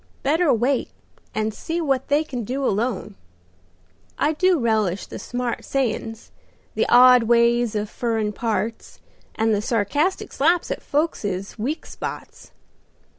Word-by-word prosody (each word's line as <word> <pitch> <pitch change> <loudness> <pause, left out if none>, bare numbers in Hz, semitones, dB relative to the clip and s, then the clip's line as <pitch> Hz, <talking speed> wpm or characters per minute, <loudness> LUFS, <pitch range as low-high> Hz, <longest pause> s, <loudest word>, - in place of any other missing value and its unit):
Better 315 +3 +3
wait 245 +3 +1 0.5
and 215 0 -1
see 325 +10 -4
what 270 -5 0
they 290 +2 +2
can 255 -6 -5
do 265 +5 -3
alone. 215 - -1 1.0
I 300 - +1
do 365 +3 +3
relish 215 - 0
the - - -8
smart 245 -1 -3
sayins, 225 -4 -3 0.4
the - - 0
odd 250 -1 +7
ways 235 -1 +3
of 210 0 -1
furrin 220 -2 -2
parts, 225 0 -3 0.4
and 220 0 +1
the 205 - +1
sarcastic 265 - 0
slaps 335 +5 +2
at - - -3
folkses 205 - -2
weak 285 +9 -3
spots. - - -8
240 Hz, 130 wpm, -22 LUFS, 220-280 Hz, 1.0 s, odd